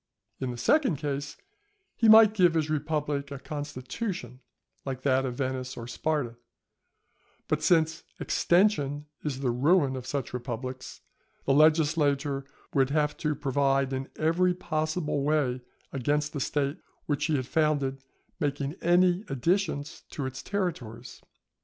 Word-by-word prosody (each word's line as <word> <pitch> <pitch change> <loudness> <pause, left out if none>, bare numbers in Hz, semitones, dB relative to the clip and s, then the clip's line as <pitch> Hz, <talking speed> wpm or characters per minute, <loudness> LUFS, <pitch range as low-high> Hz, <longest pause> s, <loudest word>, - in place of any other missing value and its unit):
In 130 - -2
the 120 - -5
second 265 - +3
case 145 0 -4 0.6
he 225 - +4
might 220 -1 +9
give 180 -5 +4
his 155 -1 0
republic 150 -2 -1
a 140 - -6
constitution 145 - -5 0.4
like 130 -1 -5
that 135 -1 +2
of 125 - -4
Venice 130 -1 -3
or 115 - -6
Sparta; 125 -2 -2 1.1
but 155 0 0
since 160 0 +3 0.2
extension 150 -6 +2 0.2
is 140 -3 -3
the 130 -3 +1
ruin 140 +2 +3
of 130 -1 -6
such 140 -4 -3
republics, 125 +1 -5 0.4
the 135 - +3
legislator 145 -2 +3 0.3
would 135 -1 +3
have 150 0 +1
to 150 -2 -1
provide 135 -1 +1
in 135 +1 -3
every 175 +3 +2
possible 155 -3 -1
way 140 -4 +1 0.3
against 145 +3 0
the 145 - -3
State 140 +1 -1 0.3
which 145 -1 0
he 160 - +1
had 130 -2 -1
founded 140 -2 0 0.4
making 145 -2 -1
any 180 +2 +3
additions 155 +1 -1
to 140 - -4
its 130 0 -5
territories. 130 - -4
145 Hz, 135 wpm, -28 LUFS, 135-160 Hz, 1.1 s, might